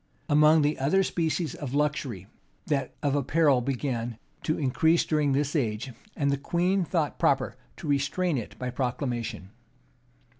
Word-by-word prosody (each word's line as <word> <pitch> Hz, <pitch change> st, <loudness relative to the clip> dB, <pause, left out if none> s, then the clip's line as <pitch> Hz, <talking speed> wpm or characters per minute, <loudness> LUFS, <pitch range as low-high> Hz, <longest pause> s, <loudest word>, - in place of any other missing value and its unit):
[] -, -, -38 dB
Among 150 Hz, +1 st, +6 dB
the 150 Hz, +1 st, 0 dB
other 155 Hz, +9 st, +3 dB
species 160 Hz, -4 st, -1 dB
of 140 Hz, -2 st, -5 dB
luxury, 145 Hz, -9 st, -1 dB, 0.4 s
that 140 Hz, -4 st, -1 dB
of 140 Hz, -2 st, +1 dB
apparel 145 Hz, -1 st, +3 dB
began 125 Hz, -2 st, -2 dB
much 110 Hz, -, -21 dB, 0.3 s
to 155 Hz, -, +1 dB
increase 160 Hz, +4 st, +2 dB
during 150 Hz, -3 st, +1 dB
this 145 Hz, +2 st, 0 dB
age; 115 Hz, -2 st, -1 dB, 0.3 s
and 140 Hz, -1 st, +1 dB
the 140 Hz, -, 0 dB
queen 180 Hz, +6 st, +1 dB
thought 165 Hz, -3 st, -1 dB
proper 135 Hz, -1 st, +2 dB, 0.2 s
to 170 Hz, -, -7 dB
restrain 145 Hz, +5 st, +1 dB
it 110 Hz, -, -9 dB
by 125 Hz, 0 st, -3 dB
proclamation. 120 Hz, -6 st, -3 dB
140 Hz, 155 wpm, -27 LUFS, 130-155 Hz, 0.4 s, Among